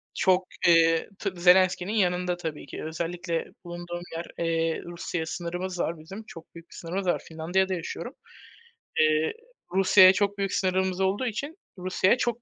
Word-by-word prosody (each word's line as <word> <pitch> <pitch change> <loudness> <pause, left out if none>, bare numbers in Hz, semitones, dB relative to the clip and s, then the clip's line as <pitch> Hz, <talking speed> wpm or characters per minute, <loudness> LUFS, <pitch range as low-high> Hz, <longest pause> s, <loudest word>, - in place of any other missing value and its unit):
Çok, 185 -1 +2 0.2
eee 165 -1 +4
tabii 185 -4 -4
Zelenski'nin 185 +1 +4
yanında 180 -3 +1
tabii 160 -5 -5
ki, - - -8
özellikle 165 +1 -3 0.2
bulunduğum 175 0 -6
yer, 170 - -4 0.2
eee, 165 0 0
Rusya'ya 170 -1 -4
sınırımız 175 +2 -4
var 165 -1 -1
bizim, 195 +8 -9
çok 165 -4 -13
büyük 170 0 -12
bir - - -14
sınırımız 180 +3 -4
var. - - +1
Finlandiya'da 180 +4 0
yaşıyorum. 170 -2 -5 0.9
Eee, 155 0 +3 0.4
Rusya'ya 190 0 +7
çok 205 +1 0
büyük 195 -1 -1
sınırımız 185 0 0
olduğu 195 +7 +1
için 275 - -4 0.2
Rusya'ya 185 +5 +2
çok 240 -1 -1
180 Hz, 150 wpm, -27 LUFS, 165-190 Hz, 0.9 s, Rusya'ya